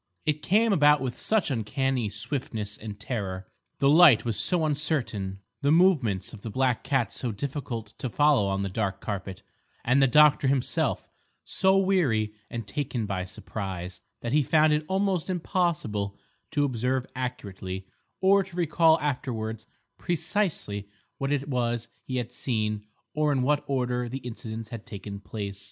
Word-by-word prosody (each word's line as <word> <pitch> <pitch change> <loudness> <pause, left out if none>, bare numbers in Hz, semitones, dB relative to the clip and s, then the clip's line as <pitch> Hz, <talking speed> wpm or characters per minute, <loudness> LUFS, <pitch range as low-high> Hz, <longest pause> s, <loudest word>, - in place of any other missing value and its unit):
It 150 -1 0
came 215 +5 +3
about 150 -4 +5
with 130 -2 -3
such 215 -8 +1
uncanny 125 0 0
swiftness 110 -1 -4
and 105 -2 -8
terror; 100 -5 -4 0.3
the 135 - +3
light 150 -5 +7
was 115 -3 -1
so 165 - +2
uncertain; 130 -11 -1 0.2
the 140 +1 +3
movements 145 - +3
of 105 - -10
the 115 - -5
black 130 +1 +1
cat 130 -6 0
so 125 - -2
difficult 115 -2 -5
to 130 - -2
follow 145 -5 +3
on 100 0 0
the - - -1
dark 100 -1 -2
carpet, 95 -2 -5 0.4
and 130 +3 +4
the 135 - +6
doctor 150 +1 +6
himself 135 -2 0 0.4
so 190 0 +3
weary 150 - +2 0.2
and 115 -2 -5
taken 125 0 -2
by 95 -3 -2
surprise—that 95 +4 -6
he 150 - +5
found 155 +2 +4
it 150 +1 +1
almost 190 -2 0
impossible 160 - -1 0.3
to 145 - +1
observe 130 0 0
accurately, 95 -7 -5 0.4
or 195 +1 +5
to 190 -2 -9
recall 165 -1 +4
afterwards 115 -6 -3 0.3
precisely 160 - -1 0.3
what 135 +1 -1
it 145 -1 0
was 120 -3 -1
he 130 - -5
had 125 -1 -3
seen 105 -4 -2 0.3
or 150 -1 +2
in 135 -3 +1
what 145 +2 +2
order 125 -2 -1
the 130 - -4
incidents 115 -3 -7
had 115 -3 -7
taken 100 -1 -7
place. 100 -1 -6
125 Hz, 155 wpm, -27 LUFS, 105-150 Hz, 0.4 s, light